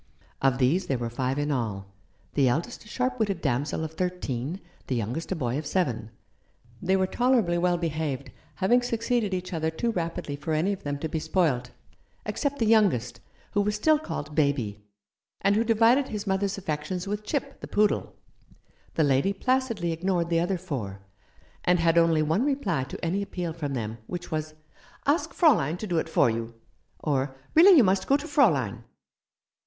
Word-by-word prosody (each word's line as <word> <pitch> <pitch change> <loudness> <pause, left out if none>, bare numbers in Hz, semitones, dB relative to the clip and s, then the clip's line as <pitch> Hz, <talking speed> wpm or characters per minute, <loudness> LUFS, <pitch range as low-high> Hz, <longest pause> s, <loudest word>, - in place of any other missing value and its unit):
Of 135 -2 +3
these 155 +9 +2
there 135 - 0
were 120 -1 -4
five 130 +2 -1
in 145 +1 0
all 110 -7 -2 0.2
— 100 +2 -37
the 140 -3 +3
eldest 165 - -2
a - - -14
sharp 255 +2 -2
witted 200 -5 0
damsel 145 +3 -1
of 160 - -4
thirteen, 175 -4 -3 0.3
the 130 - -1
youngest 120 - -3
a - - +1
boy 130 -3 -1
of 155 - -6
seven. 125 - -1 0.7
They 190 +2 +2
were 190 0 +2
tolerably 230 -6 +2
well 175 0 +2
behaved, 155 -4 -3 0.2
having 235 +6 +3
succeeded 230 -2 0
each 185 0 -3
other 160 -1 0
too 230 +9 -1
rapidly 165 -6 -3
for 145 +3 -3
any 170 +6 +1
of 195 - -7
them 145 -1 -3
to 160 - -3
be 160 - -2
spoilt, 150 -8 0 0.6
except 285 -1 -2
the 230 - +1
youngest, 200 - +3 0.3
who 205 - +2
was 210 +1 0
still 305 +8 +3
called 150 - -5
Baby, 140 -9 0 0.6
and 200 +1 +3
who 220 - +3
divided 230 +4 +4
his 210 -1 -5
mother's 195 0 0
affections 180 +2 -3
with 210 +1 -3
Chip, 275 +4 -3
the - - -6
poodle. 210 0 +1 0.8
The 160 - +3
lady 140 +7 +2
placidly 255 -5 0
ignored 170 0 0
the 165 - +3
other 180 +3 0
four, 125 - -5 0.6
and 180 0 +3
had 165 0 +4
only 165 -2 +3
one 160 +9 +1
reply 230 - 0
to - - -6
any 185 +5 0
appeal 180 -4 -4
from 145 -4 -4
them, 115 -1 -4
which 175 -1 -6
was, 155 0 -3 0.5
"Ask 295 +5 +1
Fraulein 180 - +3
to 215 - -5
do 175 -5 0
it 160 - -3
for 155 - +4
you," 115 0 -3 0.4
or 135 -2 -1 0.2
"Really 355 +3 +8
you 265 - +8
must 190 -1 +2
go 275 - +4
to 290 +2 -7
Fraulein." 135 - +2
170 Hz, 185 wpm, -27 LUFS, 140-205 Hz, 0.8 s, Really